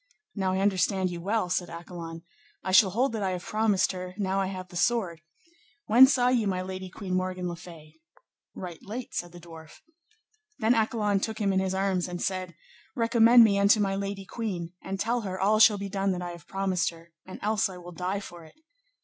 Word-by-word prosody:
Now 190 Hz, -2 st, -1 dB
I 190 Hz, -, 0 dB
understand 190 Hz, -1 st, +1 dB
you 170 Hz, -1 st, -6 dB
well, 205 Hz, +1 st, 0 dB
said 175 Hz, 0 st, -1 dB
Accolon, 170 Hz, -1 st, -8 dB, 0.4 s
I 185 Hz, -, -2 dB
shall 190 Hz, +1 st, +7 dB
hold 240 Hz, +8 st, +1 dB
that 220 Hz, -, -3 dB
I 195 Hz, -, 0 dB
have 180 Hz, -1 st, -5 dB
promised 210 Hz, -3 st, +1 dB
her 185 Hz, -1 st, -7 dB
now 195 Hz, -1 st, 0 dB
I 190 Hz, -, -1 dB
have 185 Hz, -1 st, -7 dB
the 175 Hz, -, -13 dB
sword: 180 Hz, -5 st, 0 dB, 0.6 s
when 245 Hz, +5 st, +8 dB
saw 250 Hz, -2 st, +3 dB
ye 240 Hz, -4 st, +2 dB
my 185 Hz, -1 st, -1 dB
lady 185 Hz, 0 st, -6 dB
Queen 185 Hz, 0 st, -6 dB
Morgan 185 Hz, 0 st, -1 dB
le 175 Hz, -, -4 dB
Fay? 160 Hz, -2 st, -14 dB, 0.6 s
Right 175 Hz, -3 st, -8 dB
late, 235 Hz, +5 st, -7 dB
said 175 Hz, 0 st, -4 dB
the 175 Hz, -, -12 dB
dwarf. 160 Hz, -2 st, -13 dB, 0.8 s
Then 225 Hz, -1 st, +3 dB
Accolon 215 Hz, -3 st, +1 dB
took 220 Hz, +2 st, -3 dB
him 200 Hz, -2 st, +1 dB
in 190 Hz, -, +2 dB
his 190 Hz, 0 st, -1 dB
arms 190 Hz, -2 st, 0 dB
and 175 Hz, -1 st, -5 dB
said, 185 Hz, -3 st, -3 dB, 0.4 s
Recommend 235 Hz, 0 st, +6 dB
me 200 Hz, -3 st, +3 dB
unto 200 Hz, +2 st, +5 dB
my 195 Hz, -1 st, +1 dB
lady 195 Hz, 0 st, -4 dB
queen, 185 Hz, -7 st, -5 dB
and 195 Hz, 0 st, -5 dB
tell 235 Hz, +4 st, 0 dB
her 190 Hz, -3 st, -5 dB
all 210 Hz, +3 st, +3 dB
shall 215 Hz, -1 st, +7 dB
be 200 Hz, 0 st, -4 dB
done 195 Hz, 0 st, -1 dB
that 180 Hz, -, -4 dB
I 175 Hz, -, -5 dB
have 170 Hz, -1 st, -12 dB
promised 195 Hz, -2 st, 0 dB
her, 170 Hz, 0 st, -15 dB, 0.2 s
and 185 Hz, -, -8 dB
else 215 Hz, 0 st, +1 dB
I 185 Hz, -, -9 dB
will 175 Hz, 0 st, -10 dB
die 185 Hz, +3 st, -3 dB
for 175 Hz, -3 st, -11 dB
it. 160 Hz, -, -17 dB
190 Hz, 215 wpm, -27 LUFS, 180-210 Hz, 0.8 s, when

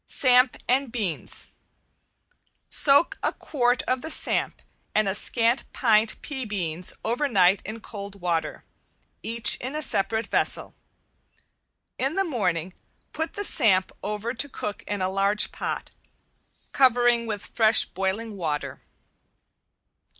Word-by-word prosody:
~SAMP 250 Hz, -1 st, +4 dB
AND 260 Hz, 0 st, +1 dB
BEANS~ 205 Hz, -9 st, -3 dB, 1.2 s
Soak 285 Hz, +3 st, +5 dB
a -, -, 0 dB
quart 245 Hz, -3 st, 0 dB
of 255 Hz, 0 st, -1 dB
the 320 Hz, -, -6 dB
samp -, -, +1 dB, 0.3 s
and 215 Hz, -1 st, +2 dB
a 195 Hz, -, 0 dB
scant 230 Hz, +4 st, +2 dB
pint 220 Hz, -2 st, +2 dB
pea 270 Hz, -3 st, -4 dB
beans 180 Hz, -5 st, -3 dB
over 245 Hz, +6 st, 0 dB
night 195 Hz, -5 st, +3 dB
in 220 Hz, +3 st, -7 dB
cold 200 Hz, -2 st, -9 dB
water, 170 Hz, -2 st, -2 dB, 0.6 s
each 230 Hz, -1 st, +1 dB
in 260 Hz, +4 st, -6 dB
a 305 Hz, -, -2 dB
separate 220 Hz, 0 st, 0 dB
vessel. -, -, 0 dB, 1.3 s
In 270 Hz, +5 st, -1 dB
the 390 Hz, -, +2 dB
morning 185 Hz, -, -2 dB, 0.4 s
put 320 Hz, 0 st, -4 dB
the 410 Hz, -, -4 dB
samp 195 Hz, -, +4 dB
over 210 Hz, +4 st, -3 dB
to 285 Hz, +4 st, -2 dB
cook 210 Hz, -5 st, -6 dB
in 205 Hz, -2 st, -3 dB
a -, -, +1 dB
large 195 Hz, +2 st, +1 dB
pot, -, -, -5 dB, 0.8 s
covering 240 Hz, -3 st, +3 dB
with 210 Hz, -2 st, -4 dB
fresh 220 Hz, -1 st, +3 dB
boiling 195 Hz, +4 st, -3 dB
water. 155 Hz, -6 st, -4 dB
225 Hz, 130 wpm, -25 LUFS, 195-250 Hz, 1.3 s, Soak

